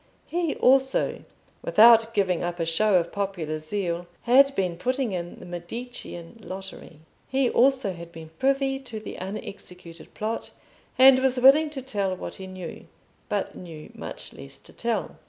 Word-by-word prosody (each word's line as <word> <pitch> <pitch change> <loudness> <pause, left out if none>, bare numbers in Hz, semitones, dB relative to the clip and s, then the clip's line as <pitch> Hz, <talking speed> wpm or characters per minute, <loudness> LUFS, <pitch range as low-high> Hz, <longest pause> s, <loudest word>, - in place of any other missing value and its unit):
He 340 -3 -1
also, 265 +1 +2 0.4
without 225 0 +6
giving 185 -4 +1
up 175 0 -3
a 165 - 0
show 195 +5 +2
of 170 -1 +2
popular 180 -6 -3
zeal, 175 +1 -3 0.2
had 275 +3 +5
been 180 -3 0
putting 255 +5 -1
in 175 -2 -5
the - - -11
Medicean 175 +2 -7
lottery. 190 -5 -9 0.3
He 265 -1 +1
also 255 -6 +3
had 170 -1 -10
been 160 -1 -11
privy 270 0 +1
to 240 -5 -7
the 215 - -8
unexecuted 180 -3 -8
plot, 220 +2 -3 0.5
and 260 0 +8
was 260 -1 +1
willing 285 +5 +6
to 275 -3 -7
tell 200 -7 -1
what - - -7
he 190 - -7
knew, 185 -3 -8 0.4
but - - -1
knew 160 -4 -10
much - - -7
less 70 -1 -8
to - - -13
tell. - - -2
200 Hz, 155 wpm, -26 LUFS, 175-260 Hz, 0.5 s, and